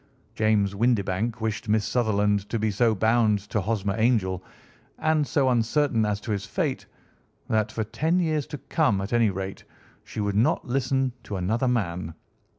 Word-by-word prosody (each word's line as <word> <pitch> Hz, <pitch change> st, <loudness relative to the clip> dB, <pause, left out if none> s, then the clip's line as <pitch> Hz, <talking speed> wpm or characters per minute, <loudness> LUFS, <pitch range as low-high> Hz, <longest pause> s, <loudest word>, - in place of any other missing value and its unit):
James 105 Hz, -2 st, +2 dB
Windibank 110 Hz, 0 st, 0 dB
wished 110 Hz, -1 st, -3 dB
Miss 105 Hz, -1 st, +2 dB
Sutherland 105 Hz, -4 st, +1 dB
to 115 Hz, -, -1 dB
be 110 Hz, 0 st, 0 dB
so 110 Hz, +2 st, +2 dB
bound 110 Hz, 0 st, +3 dB
to 110 Hz, -, +1 dB
Hosmer 100 Hz, -1 st, -1 dB
Angel, 100 Hz, -6 st, +1 dB, 0.5 s
and 155 Hz, -2 st, +1 dB
so 135 Hz, -2 st, +2 dB
uncertain 120 Hz, -1 st, +2 dB
as 105 Hz, -1 st, -1 dB
to 110 Hz, -, -5 dB
his 100 Hz, -2 st, -1 dB
fate, -, -, -2 dB, 0.6 s
that 110 Hz, -1 st, +1 dB
for 110 Hz, -, -2 dB
ten 160 Hz, -, 0 dB
years 155 Hz, -5 st, 0 dB
to 150 Hz, -, -6 dB
come, 140 Hz, -, +1 dB
at 100 Hz, +4 st, -4 dB
any 115 Hz, -2 st, +4 dB
rate, 95 Hz, 0 st, -5 dB, 0.4 s
she -, -, -8 dB
would 105 Hz, -1 st, 0 dB
not 110 Hz, +4 st, +2 dB
listen 130 Hz, 0 st, 0 dB
to 105 Hz, -, -6 dB
another 110 Hz, +8 st, 0 dB
man. 90 Hz, -9 st, -1 dB
110 Hz, 165 wpm, -25 LUFS, 100-125 Hz, 0.6 s, any